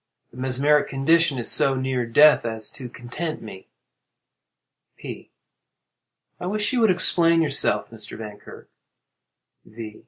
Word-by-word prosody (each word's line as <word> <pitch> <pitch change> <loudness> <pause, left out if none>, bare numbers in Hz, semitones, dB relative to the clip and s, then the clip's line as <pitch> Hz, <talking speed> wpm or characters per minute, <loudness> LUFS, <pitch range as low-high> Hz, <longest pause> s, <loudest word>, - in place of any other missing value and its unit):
The - - -16
mesmeric 135 +3 +1
condition 150 +2 +2
is 120 - +1
so 135 -1 +3
near 130 -2 -2
death 150 +6 +5
as 110 -2 -4
to 130 -3 -9
content 125 +8 -7
me. 95 -4 -12 1.3
P. - - -10 1.1
I 180 - -5
wish 210 +5 0
you 250 - +1
would 220 - +4
explain 170 -2 +3
yourself, 140 -5 0
Mr. 110 -2 -9
Vankirk. 105 -2 -11 1.0
_V. 110 -1 -10
130 Hz, 125 wpm, -22 LUFS, 115-165 Hz, 1.3 s, death